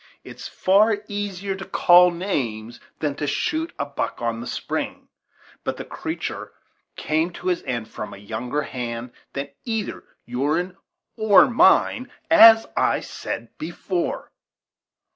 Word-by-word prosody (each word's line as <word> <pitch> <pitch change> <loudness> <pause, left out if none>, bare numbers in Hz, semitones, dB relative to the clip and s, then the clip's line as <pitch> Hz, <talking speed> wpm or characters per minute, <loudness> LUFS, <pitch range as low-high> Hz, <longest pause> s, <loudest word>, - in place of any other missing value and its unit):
"It's - - -9
far 205 +3 +3
easier 200 -1 -3
to 190 0 -7
call 180 -1 +6
names 120 - -3 0.2
than 150 -2 -1
to 150 - -2
shoot 320 - -1
a - - -1
buck 140 -1 -4
on 115 -1 -2
the 120 - -7
spring; - - -4 0.5
but - - -3
the - - -6
creatur - - -5 0.4
came 160 +2 0
by 175 - -11
his 180 -2 -1
end 120 -4 -2
from 105 - -7
a - - -9
younger 115 +8 -3
hand 120 -2 -5 0.2
than 140 +1 -4
either 225 -3 -3 0.2
your'n 150 +9 -1 0.4
or 215 -3 +6
mine, 245 -2 +3 0.2
as 225 -8 +9
I - - +2
said 115 0 -6
before." 175 +2 -3
165 Hz, 135 wpm, -23 LUFS, 120-200 Hz, 0.5 s, as